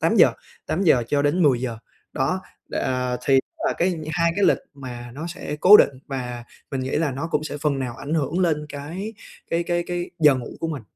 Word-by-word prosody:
tám - - +2
giờ, - - +7 0.3
8:00 160 -8 +3
cho 145 -1 +2
đến 170 +5 +2
10:00 125 -5 +2 0.3
đó, 150 +7 0 0.3
đ - - -7
à, 125 -1 0
thì 135 -1 +6 0.3
là - - +2
cái 175 0 +2 0.2
hai 170 -1 +2
cái 205 - +3
lịch - - +4 0.2
mà 120 -3 -8
nó 155 +4 -5
sẽ 175 -4 -5
cố 205 +3 +10
định. - - +5 0.2
Và 125 -3 -5 0.3
mình 135 -2 -2
nghĩ 130 +1 -3
là 155 -2 +1
nó 140 +5 -3
cũng 150 +1 0
sẽ 150 - -4
phần 140 -2 0
nào 125 -2 -4
ảnh 140 +4 -4
hưởng 155 +3 0
lên 155 -4 +1
cái 165 +10 -6 0.4
cái 170 +1 +1
cái 175 0 0
cái 175 0 -3
giờ 150 -3 +6
ngủ 125 -2 -4
của 165 - -1
mình. 145 -7 -4
145 Hz, 220 wpm, -23 LUFS, 130-170 Hz, 0.4 s, cố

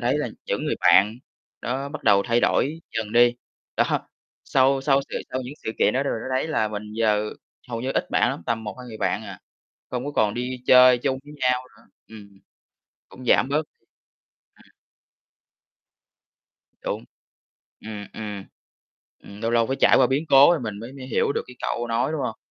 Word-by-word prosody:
thấy 130 +4 +1
là 145 - -2 0.2
những - - -2
người - - 0
bạn 105 +5 +5 0.4
đó 135 +3 -3
bắt 155 - -8
đầu 100 -2 +5
thay 120 +2 +1
đổi 155 +5 +1 0.2
dần 110 -1 -3
đi. 120 0 +5 0.4
Đó, - - +4 0.6
sau 135 0 +3
sau 135 0 +3
sự - - -2
sau 130 - -2
những 130 +4 -8
sự - - -1
kiện - - +3
đó 135 - +2
đ - - -5
đó - - 0 0.2
thấy 145 +5 0
là 110 -8 0
mình 105 0 -5
giờ 105 -1 +1 0.4
hầu 115 -1 -4
như 130 +2 -2
ít - - -1
bạn - - +3
lắm, - - -6
tầm 115 -1 -1
1-2 125 +4 -7
người 110 - -8
bạn 95 +1 -1
à, - - -9 0.5
không 125 +1 -3
có 145 - -3
còn 105 -7 +1
đi 125 +1 -4
chơi 125 -1 +7
chung 130 0 -1
với 150 - -12
nhau 125 0 +2 0.2
nữa. - - -21 0.2
Ừm, 100 -3 -14 0.7
cũng 130 - -12
giảm 130 - +4
bớt. 150 +3 +1
Ừm. - - -51 2.4
Đúng. - - -3 0.8
Ừm, 105 -2 -7
ừm, 105 -3 -6 0.7
ừm, 100 +1 -13
lâu 115 - 0
lâu 115 -1 +3
phải 135 - -2
trải - - +6
qua - - +5
biến 140 +4 0
cố 135 +3 +8
rồi 170 -3 +2
mình 105 -4 -5
mới 120 +3 -8
mới 135 -2 -9
hiểu 135 - +1
được - - -2
cái 125 - -13
câu 120 0 -2
nói, 115 +6 0
đúng 155 - -2
hông? 115 - -3
120 Hz, 195 wpm, -24 LUFS, 110-135 Hz, 2.4 s, cố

